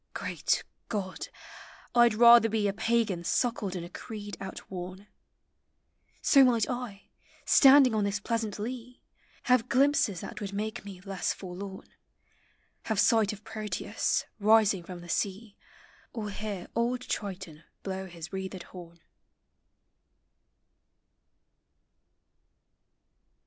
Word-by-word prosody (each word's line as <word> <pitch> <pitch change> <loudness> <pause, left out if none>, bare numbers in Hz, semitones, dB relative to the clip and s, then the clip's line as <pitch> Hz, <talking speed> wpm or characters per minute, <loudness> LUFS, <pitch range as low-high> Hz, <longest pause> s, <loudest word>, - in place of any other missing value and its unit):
— - - -46
Greal - - -4 0.5
<Jod! 195 -4 -4 0.7
I 240 0 +7
M 215 -2 -1
rather 235 -1 +8
be 215 -1 +1
A 195 - 0
Pagan 220 -4 0
suckled 210 -1 0
in 175 - -4
a 170 - -8
creed 205 0 -7
outworn, 190 0 -7 1.2
So 275 -2 +7
might 235 -4 +3
I, 245 -5 -5 0.4
standing 270 -3 +7
on 215 -1 +1
this 200 +1 -1
pleasant 225 -1 -2
lea. 245 +3 -7 0.4
Have 250 -1 +2
glimpses 260 -8 +2
that - - -8
would 200 -1 -5
make 215 +3 -4
me 195 -2 -10
less 195 -1 -2
forlorn; 190 +1 -8 1.0
Have 220 -3 -1
sight 220 -2 +4
of 210 0 -10
Proteus 210 -1 -2
rising 215 -2 +4
from 175 0 -9
(lie 175 - -11
sea, 200 +4 -2 0.6
Or 215 -3 -4
hear 200 -3 -5
old 240 +2 0
Triton 190 -9 -5 0.2
blow 190 -1 -4
his 170 0 -10
wreathed 190 -1 -5
horn. 170 -2 -12
205 Hz, 120 wpm, -29 LUFS, 190-230 Hz, 1.2 s, rather